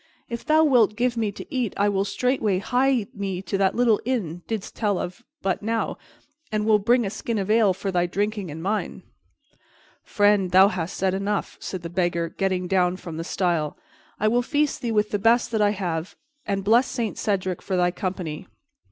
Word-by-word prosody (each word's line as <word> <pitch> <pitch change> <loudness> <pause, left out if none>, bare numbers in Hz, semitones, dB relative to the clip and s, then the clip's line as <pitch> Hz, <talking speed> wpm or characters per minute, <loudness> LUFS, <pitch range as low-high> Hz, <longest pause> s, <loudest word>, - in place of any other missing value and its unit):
If 235 -1 -5
thou 315 0 +4
wilt 240 -8 +4
give 245 +1 0
me 220 -3 0
to - - -8
eat, 250 -5 -1
I 205 - +3
will 200 -1 +1
straightway 220 -2 0
hie 250 +3 +1
me 195 -3 -3
to 195 - -3
that 195 -1 +2
little 235 -3 +3
inn 220 -10 -2
thou - - -16
didst 220 -3 -4
tell 205 -4 0
of 180 +8 -5 0.2
but 190 - 0
now, 225 +2 -2 0.5
and 210 -1 0
will 215 -1 +4
bring 240 +3 +3
a 195 - -3
skin 230 +1 -3
of 200 +1 -1
ale 220 -3 +5
for 195 +1 -3
thy 175 -1 +1
drinking 205 0 -2
and 160 +2 -7
mine." 210 +3 -2 1.0
"Friend, 205 -3 +2
thou 190 +2 +7
hast 180 -2 -4
said 190 -1 +1
enough," 200 +1 -2
said 185 -3 -6
the 170 - -5
Beggar, 175 -2 0
getting 185 0 -1
down 180 -1 +2
from 165 -4 -8
the 165 - -3
stile. 170 -4 -1 0.4
"I 215 - +2
will 240 +3 +3
feast 290 +3 0
thee 235 - -2
with 210 -1 +1
the 205 - 0
best 235 +3 +3
that 220 -2 +1
I 205 - +4
have 180 -4 -3 0.3
and 195 -1 -1
bless 230 +6 +4
Saint 235 -5 -3
Cedric 185 -4 -1
for 190 -2 -2
thy 180 0 +3
company. 180 -2 -4
200 Hz, 205 wpm, -24 LUFS, 185-225 Hz, 1.0 s, thou